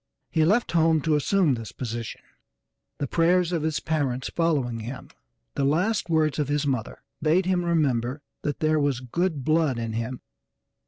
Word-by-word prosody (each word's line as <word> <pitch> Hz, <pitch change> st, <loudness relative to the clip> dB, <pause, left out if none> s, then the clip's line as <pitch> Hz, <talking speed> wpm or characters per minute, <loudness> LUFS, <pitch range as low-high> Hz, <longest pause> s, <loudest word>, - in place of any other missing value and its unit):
He 160 Hz, -, +3 dB
left 210 Hz, +8 st, +2 dB
home 160 Hz, -1 st, +4 dB
to 155 Hz, 0 st, +2 dB
assume 165 Hz, +1 st, +2 dB
this 115 Hz, -5 st, -5 dB
position, 115 Hz, -2 st, -5 dB, 0.8 s
the 145 Hz, -, -2 dB
prayers 175 Hz, +4 st, +2 dB
of 170 Hz, -3 st, 0 dB
his 155 Hz, 0 st, -1 dB
parents 140 Hz, -5 st, -1 dB
following 140 Hz, -9 st, +1 dB
him. 125 Hz, +4 st, -7 dB, 0.4 s
The 140 Hz, -, -1 dB
last 175 Hz, +8 st, +1 dB
words 155 Hz, -3 st, +2 dB
of 145 Hz, -, 0 dB
his 145 Hz, 0 st, 0 dB
mother 130 Hz, -5 st, -3 dB, 0.2 s
bade 160 Hz, +5 st, +3 dB
him 180 Hz, -1 st, +1 dB
remember 140 Hz, -5 st, 0 dB, 0.2 s
that 145 Hz, -, -3 dB
there 155 Hz, 0 st, +3 dB
was 140 Hz, -4 st, +1 dB
good 155 Hz, +3 st, -1 dB
blood 155 Hz, -5 st, +2 dB
in 115 Hz, -1 st, -3 dB
him. 115 Hz, +3 st, -4 dB
150 Hz, 165 wpm, -25 LUFS, 130-165 Hz, 0.8 s, home